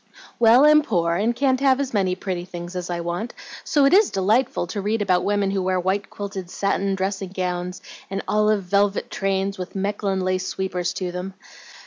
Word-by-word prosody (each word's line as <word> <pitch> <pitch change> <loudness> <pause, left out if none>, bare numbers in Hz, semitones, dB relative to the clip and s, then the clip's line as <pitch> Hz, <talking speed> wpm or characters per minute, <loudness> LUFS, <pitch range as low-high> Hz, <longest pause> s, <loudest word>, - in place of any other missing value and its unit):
"Well, 240 +4 +6
I'm 300 0 +7
poor 170 - 0
and 215 +7 0
can't 260 0 +2
have 270 -1 +3
as 275 -3 -2
many 190 -3 +1
pretty 185 -2 -4
things 175 0 -8
as 180 -1 -4
I 175 -1 -2
want, 175 +7 -4 0.3
so 290 -2 +3
it 275 - +4
IS 405 +1 +6
delightful 215 +3 +1
to 200 +4 -4
read 215 +3 0
about 185 -3 +2
women 205 -1 +1
who 195 -1 0
wear 185 0 0
white 190 +3 -1
quilted 195 -3 -6
satin 195 0 0
dressing 190 0 -2
gowns 180 -1 -3 0.3
and 195 0 -3
olive 210 0 +2
velvet 200 +2 +1
trains 195 0 -1
with 180 - -6
Mechlin 195 -1 -1
lace 185 0 -1
sweepers 180 -2 -2
to 180 -2 -3
them. 180 +2 -6
195 Hz, 190 wpm, -23 LUFS, 185-210 Hz, 0.3 s, I'm